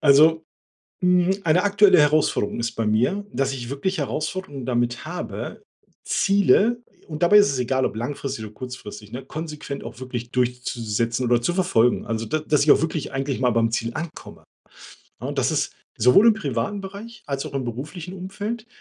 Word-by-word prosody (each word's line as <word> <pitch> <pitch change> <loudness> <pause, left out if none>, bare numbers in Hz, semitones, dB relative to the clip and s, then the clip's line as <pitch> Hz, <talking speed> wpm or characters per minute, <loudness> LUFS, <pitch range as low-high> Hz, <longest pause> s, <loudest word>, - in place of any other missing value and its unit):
Also, 155 +3 +5 0.6
hm, 180 +1 +3
eine 165 +3 +3
aktuelle 205 -2 +5
Herausforderung 150 -8 +2
ist 115 0 -2
bei 115 -1 -2
mir, 125 - +1
dass 135 0 0
ich 120 -2 -6
wirklich 185 +8 -2
Herausforderungen 150 -4 -4
damit 120 -1 -1
habe, 175 - -6 0.4
Ziele 205 +4 +3 0.3
und 155 -1 -6
dabei 175 +4 +6
ist 205 - +5
es 135 - -2
egal, 130 +1 0
ob - - -2
langfristig 130 0 -4
oder 105 - -10
kurzfristig, 105 -4 -9
ne, 130 +2 -6
konsequent 150 -1 -6
auch 120 - -9
wirklich 120 -2 -5
durchzusetzen 120 -1 -1
oder 120 0 +3
zu 175 - +1
verfolgen. 125 -11 +2
Also 115 0 -2
da 155 - 0
dass 150 -1 +2
ich 150 - +3
auch - - +3
wirklich 160 -2 -2
eigentlich 135 -1 -2
mal 125 -1 +3
beim 115 0 +2
Ziel 115 0 -2
ankomme. 165 0 -7 0.8
Ja, - - -4
und - - -4
das - - +2
ist - - -1 0.3
sowohl 125 - +6
im 225 - +5
privaten 145 - -2
Bereich 200 +4 -9
als 140 -1 -3
auch - - -9
im 135 -2 -1
beruflichen 150 +9 -6
Umfeld, 205 +5 -5
140 Hz, 180 wpm, -23 LUFS, 120-180 Hz, 0.8 s, dabei